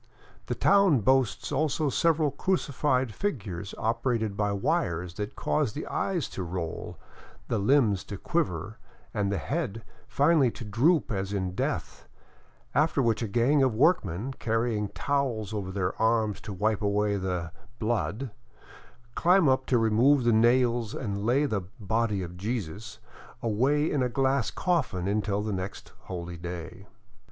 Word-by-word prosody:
The -, -, -1 dB
town 195 Hz, -, +4 dB
boasts 130 Hz, -1 st, +1 dB
also 150 Hz, 0 st, 0 dB
several 160 Hz, -1 st, +2 dB
crucified 135 Hz, -, 0 dB
figures 100 Hz, -, -4 dB
operated 115 Hz, -2 st, 0 dB
by 105 Hz, 0 st, 0 dB
wires 90 Hz, -, -1 dB
that 105 Hz, +3 st, -5 dB
cause 145 Hz, -8 st, 0 dB
the 150 Hz, -, -5 dB
eyes 180 Hz, -7 st, -1 dB
to -, -, -6 dB
roll, 85 Hz, -2 st, -5 dB, 0.5 s
the -, -, +1 dB
limbs 105 Hz, -3 st, +3 dB
to 100 Hz, -, -6 dB
quiver, 110 Hz, -, -2 dB, 0.3 s
and 100 Hz, -3 st, 0 dB
the 100 Hz, -, 0 dB
head 115 Hz, -, -3 dB, 0.2 s
finally 145 Hz, -2 st, +3 dB
to 115 Hz, -, -8 dB
droop 135 Hz, -, +2 dB
as 100 Hz, -1 st, -2 dB
in 95 Hz, -2 st, -2 dB
death, -, -, -3 dB, 0.7 s
after 155 Hz, 0 st, +2 dB
which 115 Hz, -4 st, +2 dB
a 115 Hz, -, -1 dB
gang 120 Hz, +7 st, +3 dB
of 130 Hz, -4 st, +2 dB
workmen, 125 Hz, -, +2 dB
carrying 115 Hz, -2 st, 0 dB
towels 120 Hz, -4 st, -1 dB
over 100 Hz, -3 st, -3 dB
their 95 Hz, -1 st, -1 dB
arms 110 Hz, -2 st, +2 dB
to 105 Hz, -, -7 dB
wipe 105 Hz, +2 st, 0 dB
away 105 Hz, 0 st, +1 dB
the 90 Hz, -3 st, -3 dB, 0.3 s
blood," 115 Hz, +2 st, -2 dB, 0.8 s
climb 180 Hz, +2 st, +4 dB
up 130 Hz, 0 st, +2 dB
to 125 Hz, -, +3 dB
remove 120 Hz, +5 st, +4 dB
the 120 Hz, -1 st, +3 dB
nails 120 Hz, 0 st, +3 dB
and 100 Hz, -3 st, -3 dB
lay 135 Hz, +5 st, +3 dB
the 110 Hz, -8 st, -1 dB
" 100 Hz, +8 st, -18 dB, 0.2 s
body 105 Hz, -5 st, 0 dB
of 90 Hz, 0 st, -8 dB
Jesus 105 Hz, 0 st, -4 dB, 0.2 s
" 115 Hz, -, -20 dB
away 130 Hz, +8 st, +2 dB
in 145 Hz, -, +1 dB
a 125 Hz, -, +1 dB
glass 135 Hz, 0 st, +1 dB
coffin 130 Hz, -, -1 dB
until 100 Hz, 0 st, 0 dB
the 105 Hz, -1 st, -2 dB
next 95 Hz, +1 st, -6 dB
holy 85 Hz, -1 st, -6 dB
day. 90 Hz, +3 st, -7 dB
115 Hz, 150 wpm, -28 LUFS, 100-135 Hz, 0.8 s, town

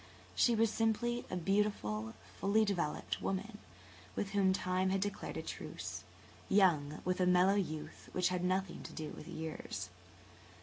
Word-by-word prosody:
She 240 Hz, -, +4 dB
was 225 Hz, 0 st, +3 dB
simply 235 Hz, +2 st, +1 dB
a -, -, -2 dB
beautiful, 165 Hz, -, 0 dB, 0.2 s
fully 215 Hz, +2 st, +4 dB
developed 175 Hz, -7 st, -1 dB
woman, 210 Hz, +3 st, -2 dB, 0.6 s
with 195 Hz, -, -2 dB
whom 195 Hz, -2 st, +4 dB
Time 185 Hz, 0 st, +1 dB
had 195 Hz, +1 st, +2 dB
declared 205 Hz, +1 st, -3 dB
a -, -, -3 dB
truce, -, -, -6 dB, 0.5 s
young 155 Hz, -7 st, +3 dB
with 185 Hz, +1 st, +1 dB
a 180 Hz, -, +4 dB
mellow 180 Hz, +2 st, +5 dB
youth 155 Hz, -6 st, -3 dB
which 180 Hz, 0 st, +2 dB
had 180 Hz, -1 st, -1 dB
nothing 185 Hz, 0 st, 0 dB
to -, -, -8 dB
do 155 Hz, -1 st, -5 dB
with -, -, -9 dB
years. 155 Hz, -12 st, -5 dB
185 Hz, 155 wpm, -35 LUFS, 160-205 Hz, 0.6 s, mellow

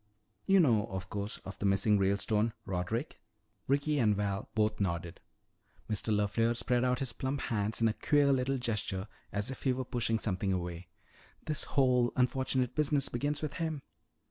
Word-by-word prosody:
You 195 Hz, 0 st, +6 dB
know, 115 Hz, -, +4 dB
of 95 Hz, -1 st, -6 dB
course, 100 Hz, +3 st, -3 dB
of 95 Hz, -, -8 dB
the 100 Hz, -, +1 dB
missing 100 Hz, +2 st, +3 dB
Ralestone 105 Hz, +3 st, +1 dB
Roderick?" 100 Hz, -, -3 dB, 0.5 s
Ricky 145 Hz, +2 st, +1 dB
and 105 Hz, -4 st, +3 dB
Val 100 Hz, 0 st, -2 dB
both 110 Hz, 0 st, +1 dB
nodded. 85 Hz, -2 st, -2 dB, 0.7 s
Mr. 110 Hz, +1 st, -1 dB
LeFleur 110 Hz, +3 st, +1 dB
spread 125 Hz, 0 st, +1 dB
out 125 Hz, 0 st, +2 dB
his 130 Hz, -3 st, -3 dB
plump 135 Hz, +1 st, -2 dB
hands 110 Hz, 0 st, -1 dB
in 115 Hz, -, +5 dB
a 110 Hz, -, +1 dB
queer 145 Hz, +3 st, +3 dB
little 135 Hz, +1 st, +1 dB
gesture 110 Hz, -5 st, -2 dB, 0.2 s
as 105 Hz, +5 st, -2 dB
if 135 Hz, -, -8 dB
he 130 Hz, -, +2 dB
were 130 Hz, 0 st, -3 dB
pushing 115 Hz, -2 st, 0 dB
something 100 Hz, -2 st, -1 dB
away. 90 Hz, -1 st, -3 dB, 0.6 s
"This 155 Hz, -2 st, -2 dB
whole 125 Hz, -3 st, +3 dB
unfortunate 130 Hz, 0 st, +1 dB
business 145 Hz, -2 st, +2 dB
begins 145 Hz, +5 st, -2 dB
with 155 Hz, -, -2 dB
him. 160 Hz, -4 st, -2 dB
115 Hz, 170 wpm, -32 LUFS, 100-130 Hz, 0.7 s, You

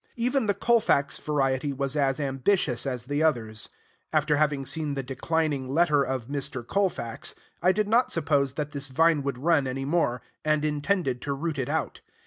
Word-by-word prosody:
Even 245 Hz, 0 st, +1 dB
the 205 Hz, -, +2 dB
Colfax 200 Hz, -, +2 dB
variety 140 Hz, -1 st, 0 dB
was 140 Hz, +1 st, -2 dB
as 140 Hz, -1 st, +1 dB
ambitious 135 Hz, -, +1 dB
as 125 Hz, -2 st, -3 dB
the 145 Hz, +3 st, -1 dB
others. 115 Hz, -9 st, 0 dB, 0.4 s
After 155 Hz, -1 st, +2 dB
having 145 Hz, -2 st, +1 dB
seen 150 Hz, -1 st, -1 dB
the 135 Hz, -, -3 dB
declining 140 Hz, +1 st, -1 dB
letter 150 Hz, 0 st, +3 dB
of 130 Hz, -3 st, -2 dB
Mr. 140 Hz, -3 st, -4 dB
Colfax, 175 Hz, -, -1 dB, 0.3 s
I 180 Hz, -, +5 dB
did 210 Hz, +2 st, 0 dB
not 235 Hz, +4 st, +3 dB
suppose 140 Hz, -5 st, +1 dB
that 150 Hz, 0 st, -3 dB
this 140 Hz, -1 st, -3 dB
vine 160 Hz, +3 st, +3 dB
would 140 Hz, -2 st, -3 dB
run 145 Hz, 0 st, +2 dB
any 135 Hz, +1 st, -3 dB
more, 140 Hz, -5 st, 0 dB, 0.2 s
and 155 Hz, 0 st, +1 dB
intended 150 Hz, -3 st, 0 dB
to 140 Hz, -, -2 dB
root 150 Hz, +1 st, -3 dB
it 130 Hz, -, -2 dB
out. -, -, -2 dB
145 Hz, 175 wpm, -27 LUFS, 135-160 Hz, 0.4 s, I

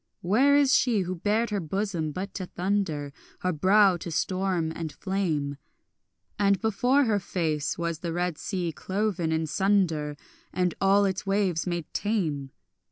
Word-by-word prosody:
Where 250 Hz, +11 st, +4 dB
is 280 Hz, -2 st, +4 dB
she 230 Hz, -6 st, +3 dB
who 180 Hz, 0 st, -2 dB
bared 210 Hz, +5 st, 0 dB
her 205 Hz, -, 0 dB
bosom 175 Hz, -2 st, -2 dB
but 190 Hz, +6 st, -5 dB
to 185 Hz, -2 st, -5 dB
thunder, 175 Hz, -7 st, -2 dB, 0.3 s
Her 180 Hz, 0 st, 0 dB
brow 190 Hz, +3 st, +4 dB
to 170 Hz, -, -7 dB
storm 185 Hz, 0 st, -1 dB
and 160 Hz, -2 st, -4 dB
flame, 160 Hz, -8 st, -2 dB, 0.8 s
And 200 Hz, -1 st, +3 dB
before 245 Hz, +6 st, +2 dB
her 215 Hz, -5 st, +1 dB
face 160 Hz, -5 st, -2 dB
was 170 Hz, -2 st, -2 dB
the 170 Hz, -1 st, -4 dB
red 175 Hz, -1 st, -2 dB
sea 180 Hz, -4 st, -2 dB
cloven 190 Hz, -1 st, -2 dB
in 160 Hz, 0 st, 0 dB
sunder 160 Hz, -4 st, +1 dB, 0.3 s
And 180 Hz, -2 st, 0 dB
all 200 Hz, +1 st, +4 dB
its 190 Hz, 0 st, -2 dB
waves 195 Hz, -4 st, +1 dB
made 175 Hz, -2 st, -2 dB
tame? 160 Hz, -11 st, -1 dB
185 Hz, 155 wpm, -27 LUFS, 165-205 Hz, 0.8 s, Where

